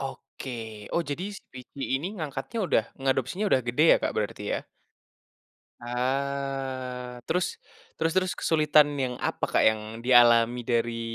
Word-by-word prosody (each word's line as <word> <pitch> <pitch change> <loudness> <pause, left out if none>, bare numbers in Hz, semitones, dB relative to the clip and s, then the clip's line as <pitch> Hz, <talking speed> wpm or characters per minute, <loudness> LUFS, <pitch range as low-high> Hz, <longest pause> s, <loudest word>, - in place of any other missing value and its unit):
Oke, 110 -5 -7
oh 170 - +2
jadi 155 +5 -3
si - - -13
Pici 130 +2 -11 0.2
ini 170 - -3
ngangkatnya 150 - -5
udah 115 - +3 0.2
ngeadopsinya 135 - 0
udah 130 - +5
gede 125 +6 +2
ya, - - +6
Kak, - - 0
berarti, 105 -1 -2
ya? - - -4 1.2
Ah, 130 -1 -3
terus, 180 0 -1 0.4
terus 165 0 0
terus 185 -1 +1
kesulitan 150 -2 +4
yang 125 -2 -1
apa, - - -2
Kak, - - +3
yang 110 -1 +4 0.2
dialami 120 -1 +6
dari 115 -1 -1
130 Hz, 140 wpm, -27 LUFS, 120-140 Hz, 1.2 s, ya